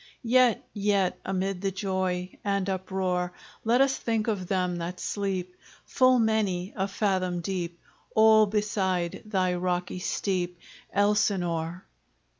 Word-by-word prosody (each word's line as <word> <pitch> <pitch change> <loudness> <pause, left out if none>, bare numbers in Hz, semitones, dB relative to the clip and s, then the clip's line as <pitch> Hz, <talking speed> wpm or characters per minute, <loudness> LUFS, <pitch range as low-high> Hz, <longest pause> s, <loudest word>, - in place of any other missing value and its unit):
Yet 245 0 +3
yet 200 -3 +1
amid 190 0 -2
the 195 - +1
joy 185 -1 -2
And 200 -2 0
uproar, 185 -2 -1 0.3
Let 235 +3 +3
us 270 0 +3
think 225 -1 -1
of 200 -5 -1
them 180 -2 0
that 175 +2 -5
sleep 190 -3 -3 0.3
Full 255 0 +4
many 210 -5 +1
a 195 -1 0
fathom 185 -3 0
deep 175 -1 -3 0.4
All 220 -1 +7
beside 195 -4 -1
thy 185 -4 +1
rocky 180 0 -2
steep, 180 -1 -1 0.3
Elsinore! 185 -4 +1
190 Hz, 120 wpm, -27 LUFS, 180-210 Hz, 0.4 s, All